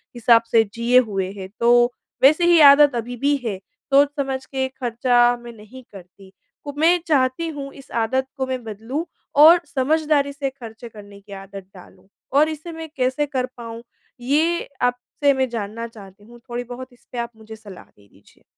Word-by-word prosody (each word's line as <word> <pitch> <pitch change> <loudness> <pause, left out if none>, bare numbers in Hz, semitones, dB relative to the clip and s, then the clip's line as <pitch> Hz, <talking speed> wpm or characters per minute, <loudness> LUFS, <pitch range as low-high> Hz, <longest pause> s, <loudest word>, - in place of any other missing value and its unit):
हिसाब 235 -1 +4
से 225 -1 +5
जिए 240 +2 +4
हुए 190 -1 -2
हैं 190 0 -8
तो 235 0 +2 0.5
वैसे 310 +5 +5
ही 345 -1 +5
आदत 285 -2 +5
अभी 240 +1 -4
भी 290 0 +3
है। 200 -4 -2 0.4
सोच 285 +1 +6
समझ 265 -1 -3
के 265 -1 -2
खर्चा 245 0 +2
मैं 240 0 -10
नहीं 225 +4 -14
करती। 190 +1 -15 0.3
कु 285 -1 -7
मैं 335 +3 +4
चाहती 275 +2 +1
हूँ 275 -1 -7
इस 275 - -15
आदत 260 +3 -1
को 265 - -1
मैं 255 -2 -4
बदलूँ 225 - -5 0.4
और 335 +3 +9
समझदारी 295 +1 0
से 275 -1 -3
खर्चे 235 -3 -11
करने 205 -2 -13
की 200 0 -13
आदत 195 -1 -11
डालूँ। 185 +1 -17 0.3
और 300 +3 +4
इसे 315 +2 -7
मैं 325 0 -8
कैसे 260 +3 0
कर 260 -3 -2
पाऊँ, 230 -1 -8 0.4
ये 315 +7 0
आपसे 245 +3 0
मैं 260 -1 -1
जानना 230 0 -5
चाहती 205 -2 -15
हूँ। 240 +1 -16
थोड़ी 240 +1 -4
बहुत 250 +1 -10
इसपे 245 0 -14
आप 235 0 -3
मुझे 220 0 -11
सलाह 205 -4 -13
दे 100 -1 -26
दीजिए। 100 +1 -25
245 Hz, 180 wpm, -21 LUFS, 225-280 Hz, 0.5 s, और